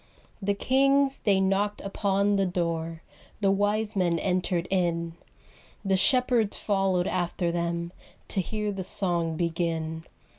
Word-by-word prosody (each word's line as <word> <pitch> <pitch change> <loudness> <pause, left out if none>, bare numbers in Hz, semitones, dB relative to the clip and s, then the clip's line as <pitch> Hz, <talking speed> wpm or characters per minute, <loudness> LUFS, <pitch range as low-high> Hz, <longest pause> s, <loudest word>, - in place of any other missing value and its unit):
The 200 +1 0
kings 275 +4 +3
they 200 -3 +4
knocked 195 +2 +1
upon 200 0 +1
the 195 -1 +2
door, 165 -2 -2 0.4
The 200 -2 +3
wise 210 +2 0
men 175 -3 +2
entered 180 -1 0
in, 170 -3 0 0.7
The 195 -1 +3
shepherds 245 -1 +2
followed 195 -3 +1
after 175 -1 -1
them 170 0 -2 0.4
To 195 - +1
hear 210 +2 -3
the 195 -1 -4
song 170 -4 0
begin. 165 -1 -2
190 Hz, 125 wpm, -27 LUFS, 170-205 Hz, 0.7 s, they